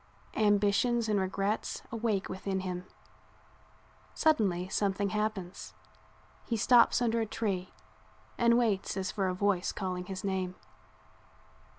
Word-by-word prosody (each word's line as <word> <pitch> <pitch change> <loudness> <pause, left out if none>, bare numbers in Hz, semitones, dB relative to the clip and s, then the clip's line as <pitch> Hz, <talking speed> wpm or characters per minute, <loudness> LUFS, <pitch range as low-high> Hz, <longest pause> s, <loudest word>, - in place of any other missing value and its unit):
Ambitions 210 +3 +3
and 210 -2 +2
regrets 195 +2 -2
awake 220 -4 -1
within 190 0 -3
him. 180 -1 -4 1.3
Suddenly 200 - +2
something 200 0 0
happens; 210 -3 -3 0.7
he 230 - -2
stops 245 +2 +5
under 230 -1 +1
a - - 0
tree 195 -4 -2 0.6
and 235 0 +4
waits 210 -5 0
as 190 0 -2
for 195 -3 -1
a 185 - -1
voice 195 -2 +1
calling 180 -2 -4
his 190 0 -6
name. 190 -2 -2
200 Hz, 115 wpm, -31 LUFS, 190-220 Hz, 1.3 s, stops